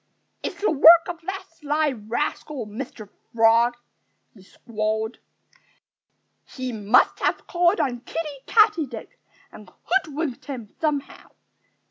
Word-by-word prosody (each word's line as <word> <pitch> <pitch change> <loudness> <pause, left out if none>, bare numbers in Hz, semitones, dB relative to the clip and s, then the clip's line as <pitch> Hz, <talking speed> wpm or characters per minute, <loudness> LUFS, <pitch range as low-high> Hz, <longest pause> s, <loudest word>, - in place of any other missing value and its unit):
"It's - - -5
the 410 - +1
work 325 +3 +7
of 345 -1 -6
that 385 0 -4
sly 300 -1 -1
rascal, 240 +3 -4
Mr. 215 0 -8 0.3
Frog!" 230 +1 +4 0.6
he 200 - -18
squalled. 220 +2 -4 1.2
"He 255 -1 -6
must 215 +1 +2
have - - -1
called 350 +2 +2
on 245 -3 -1
Kiddie 290 +1 -6
Katydid 425 - +2 0.4
and 205 -4 -14
hoodwinked 315 -7 -2
him 245 -7 -8
somehow.... 290 -3 -3
275 Hz, 110 wpm, -23 LUFS, 225-325 Hz, 1.2 s, work